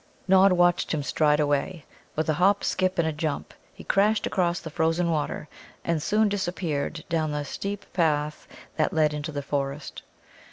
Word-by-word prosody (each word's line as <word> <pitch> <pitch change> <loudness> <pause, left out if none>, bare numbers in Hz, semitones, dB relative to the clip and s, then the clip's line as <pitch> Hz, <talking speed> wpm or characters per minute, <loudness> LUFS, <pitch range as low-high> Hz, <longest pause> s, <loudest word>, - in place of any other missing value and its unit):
Nod 190 +1 +6
watched 175 -1 +3
him 145 - -2
stride 150 +1 +2
away. 145 +3 0 0.3
With 155 - -1
a 155 - +2
hop, 195 +6 +3
skip, 185 0 0
and 170 -2 +2
a - - +1
jump 150 -1 -3 0.2
he - - -13
crashed 210 +2 +2
across 175 -2 0
the 160 - -8
frozen 165 +2 +1
water, 150 -1 -2 0.4
and 170 -2 0
soon 210 +6 +2
disappeared 175 -6 -2
down 160 -3 0
the 150 0 -2
steep 200 +6 -5
path 150 -3 0 0.3
that 155 - +1
led 155 -1 +3
into 150 +1 -4
the 145 -1 -4
forest. 140 0 -3
160 Hz, 170 wpm, -26 LUFS, 150-180 Hz, 0.4 s, Nod